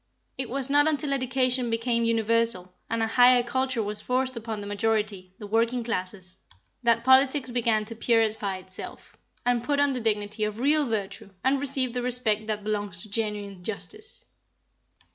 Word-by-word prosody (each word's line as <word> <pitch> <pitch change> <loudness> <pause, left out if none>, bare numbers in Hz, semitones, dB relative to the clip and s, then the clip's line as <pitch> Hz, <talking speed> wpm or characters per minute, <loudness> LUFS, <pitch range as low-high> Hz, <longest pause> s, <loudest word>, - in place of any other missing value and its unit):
It 260 -2 -3
was 270 0 0
not 290 +2 +4
until 295 -2 0
education 255 -1 +1
became 230 +1 0
universal, 230 -5 0 0.2
and 230 0 0
a - - +3
higher 245 +2 +5
culture 260 -1 -1
was 210 0 -4
forced 255 +1 0
upon 225 -2 -5
the 205 - -7
majority 205 -3 -1
the 210 - -8
working 230 +3 +1
classes 185 -3 -4 0.4
that 230 -1 +2
politics 260 +1 +4
began 230 -3 +1
to 230 - -6
purify 220 -4 +1
itself, 185 0 -9 0.3
and 245 -1 +2
put 285 +2 0
on 285 -1 +3
the 250 - -3
dignity 210 -1 -1
of 210 +1 -2
real 295 +3 +3
virtue, 205 -1 -4
and 270 +1 +2
receive 265 -3 0
the 250 - -2
respect 235 -4 +1
that 210 -1 -2
belongs 205 -4 -2
to 215 - -13
genuine 205 -4 -3
justice. 415 - -6
230 Hz, 165 wpm, -26 LUFS, 210-255 Hz, 0.4 s, higher